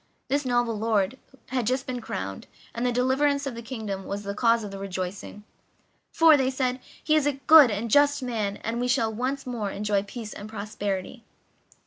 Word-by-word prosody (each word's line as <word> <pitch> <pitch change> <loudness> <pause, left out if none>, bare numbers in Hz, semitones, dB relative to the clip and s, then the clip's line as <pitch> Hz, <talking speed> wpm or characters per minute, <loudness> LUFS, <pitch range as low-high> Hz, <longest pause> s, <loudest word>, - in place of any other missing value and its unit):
This 285 +1 0
noble 240 -2 +1
lord 220 +1 0 0.3
had 250 -4 -1
just 260 +2 0
been 250 -1 -4
crowned, 95 - -5 0.3
and 235 - -3
the 250 - +2
deliverance 275 +3 +1
of 275 - -3
the 230 - -7
kingdom 220 -5 -5
was 200 +1 -4
the 200 0 -4
cause 230 +1 +2
of 205 - -6
the 195 - -7
rejoicing 195 +2 -5 0.7
"For," 325 -1 +6
they 265 -2 +2
said, 255 -1 -1 0.2
"he 310 - +3
is 300 -2 +3
a 290 - +2
good 275 +1 +7
and 215 +2 -3
just 285 0 +4
man, 215 -5 -2
and 230 +1 -2
we 245 - 0
shall 225 -2 +1
once 260 +5 -3
more 235 -5 -3
enjoy 205 0 0
peace 215 +2 -8
and 205 +1 -9
prosperity." 205 0 -4
235 Hz, 190 wpm, -26 LUFS, 205-260 Hz, 0.7 s, good